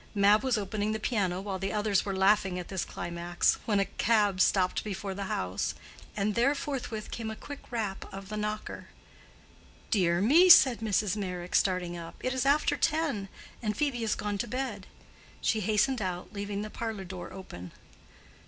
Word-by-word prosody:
Mab 205 +1 +5
was 260 -3 +1
opening 210 +1 -2
the 220 - -2
piano 195 -6 0
while 195 -1 -4
the 195 +1 -2
others 210 -2 +1
were 195 -1 -3
laughing 190 -1 +3
at 180 - -6
this 190 -2 -2
climax, 175 0 -1
when 205 -3 +2
a 195 - +2
cab 205 -4 +2
stopped 185 -2 +2
before 200 -1 -4
the 200 +1 -4
house, 90 - -2 0.4
and 205 +1 +1
there 245 +6 +3
forthwith 250 -7 -4
came 225 -1 -4
a 220 - -5
quick 285 +5 -9
rap 215 -5 -3
of 195 0 -8
the 215 - -4
knocker. 210 0 -4 1.0
"Dear 175 -4 +3
me!" 310 - +6
said 260 -8 +8
Mrs. 210 -3 +1
Meyrick, 180 -3 -5
starting 180 -2 +1
up, 165 -1 -8
"it 255 - -1
is 260 0 0
after 290 +2 +3
ten, 285 -11 0 0.3
and 210 -3 -1
Phœbe 280 -5 0
is 225 -2 0
gone 205 -1 -3
to - - -1
bed." 245 -5 -4 0.5
She 220 - +1
hastened 215 +5 +1
out, 180 +1 -4
leaving 205 0 -3
the 215 - -7
parlor 220 -4 -4
door 185 -1 -8
open. 90 - -9
205 Hz, 180 wpm, -29 LUFS, 190-225 Hz, 1.0 s, said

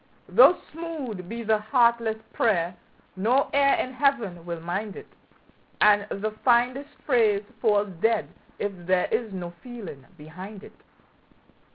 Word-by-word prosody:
Though 360 - +7
smooth 285 - -6
be 235 +1 -5
the 220 -1 +2
heartless 235 0 +2 0.2
prayer, 180 -6 +1 0.4
no 235 +8 +1
ear 280 0 +4
in 255 - -3
Heaven 240 - 0
will 170 -1 -4
mind 190 +5 -4
it, - - -9 0.7
And 205 -1 +5
the 215 +2 -3
finest 255 +3 +2 0.2
phrase 220 -6 +3 0.2
falls 210 -2 +2
dead 225 -1 +2 0.3
if 205 - -2 0.2
there 185 -1 +3
is 220 -1 -1
no 180 -2 -6
feeling 220 - -9
behind 185 +7 -10
it. - - -13
220 Hz, 135 wpm, -25 LUFS, 190-245 Hz, 0.7 s, Though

